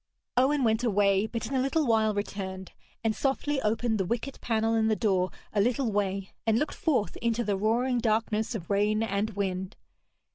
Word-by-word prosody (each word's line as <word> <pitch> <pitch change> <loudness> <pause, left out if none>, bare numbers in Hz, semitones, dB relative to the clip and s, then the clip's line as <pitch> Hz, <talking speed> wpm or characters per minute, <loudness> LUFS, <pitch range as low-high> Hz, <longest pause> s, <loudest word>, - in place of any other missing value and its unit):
Owen 270 +3 +3
went 220 0 +2
away, 200 -2 +3
but 230 0 -4
in - - -5
a 265 - +2
little 295 +4 +1
while 220 -3 +2
returned, 190 -2 -4 0.3
and 220 -1 +1
softly 275 +1 0
opened 220 +1 0
the - - +2
wicket 240 +7 -3
panel 225 -1 +1
in 220 -1 +2
the 220 - +2
door 190 -5 +1 0.2
a 205 - +3
little 245 +2 +1
way, 195 -1 -1 0.2
and 220 0 +4
looked 300 - -1
forth 260 -10 0
into 235 0 0
the 205 -2 0
roaring 240 +5 +1
darkness 220 0 0
of 185 -3 -6
rain 210 +2 +2
and 205 0 -1
wind. 190 -1 -2
220 Hz, 185 wpm, -28 LUFS, 200-240 Hz, 0.3 s, and